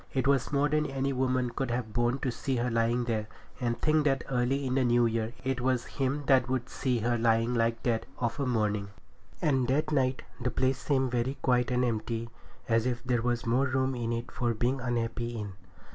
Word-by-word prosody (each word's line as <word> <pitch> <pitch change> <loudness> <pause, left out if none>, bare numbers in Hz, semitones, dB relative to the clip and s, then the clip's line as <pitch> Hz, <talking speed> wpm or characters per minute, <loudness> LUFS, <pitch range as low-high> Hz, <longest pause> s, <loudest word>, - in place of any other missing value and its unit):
It 130 - +1
was 140 -2 +2
more 140 0 +3
than 150 +1 +1
any 135 0 -1
woman 130 -1 0
could 135 +1 -2
have 120 -2 -2
borne 120 +2 +1
to 130 - 0
see 130 +3 -2
her 120 0 0
lying 115 +1 +2
there, 110 -3 -1 0.3
and 120 -1 -1
think 155 -1 +3
that 135 -3 +2
early 130 +2 +1
in 130 - -1
the 135 0 +3
new 120 -1 +4
year 115 0 -1
it 130 -1 -1
was 125 -1 +1
him 140 +1 -2
that 130 -2 +4
would 130 -1 -1
see 130 -2 0
her 120 +1 +1
lying 115 +1 +2
like 115 -1 +1
that 115 -2 0
of 120 +2 -2
a 140 - 0
morning. 105 -4 0 0.6
And 135 -5 +2
that 145 +4 +1
night 130 -3 +1 0.2
the 125 - +1
place 130 +2 +1
seemed 135 -3 +1
very 125 +3 -1
quiet 125 -1 +2
and 125 0 +2
empty, 115 0 -2 0.4
as 115 +1 +2
if 120 -1 -2
there 125 -2 +1
was 120 0 -1
more 125 +4 +2
room 130 0 0
in 120 -2 -2
it 115 0 -3
for 120 -2 -1
being 125 +4 0
unhappy 120 -1 -2
in. 105 -2 -5
125 Hz, 215 wpm, -29 LUFS, 115-130 Hz, 0.6 s, new